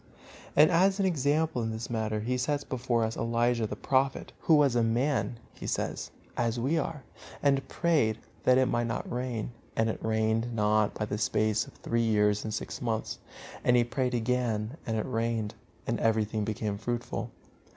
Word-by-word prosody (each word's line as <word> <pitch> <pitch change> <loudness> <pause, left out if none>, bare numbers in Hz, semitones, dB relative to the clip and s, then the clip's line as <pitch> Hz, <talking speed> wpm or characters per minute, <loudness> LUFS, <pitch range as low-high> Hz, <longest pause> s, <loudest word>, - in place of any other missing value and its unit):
And 155 +4 +7
as 190 +3 +4
an 195 - +3
example 155 -4 +1
in 110 - -1
this 110 0 -4
matter 110 -2 -1
he 125 +4 -1
sets 145 +3 0
before 120 -3 0
us 110 0 -1
Elijah, 115 0 +1
the - - -5
Prophet, 135 0 0
"who 160 - +4
was 140 -4 +4
a 120 - +4
man," 120 +2 +1 0.2
he - - -8
says, - - -2 0.3
"as 120 0 0
we 135 +7 +1
are, 150 -1 -4 0.4
and 135 -2 +2
prayed, 145 -11 +2 0.3
that 130 0 +5
it 130 - +5
might 120 -2 0
not 115 - -3
rain; 120 -2 -3 0.2
and 115 0 +2
it - - -8
rained 110 +1 +1
not 105 -1 +2
by 105 - -1
the 105 0 -3
space 110 +1 +1
of - - -13
three 115 0 -1
years 105 -2 +2
and 110 - -3
six 105 - -4
months. 115 -3 -2 0.4
And 125 0 +5
he 120 - +5
prayed 125 +1 -1
again, 120 -1 0
and 110 -1 0
it 110 - -1
rained, 115 -3 -1 0.3
and - - -1
everything 110 -1 +1
became 105 -1 -2
fruitful." 120 +2 -3
115 Hz, 180 wpm, -29 LUFS, 110-130 Hz, 0.4 s, And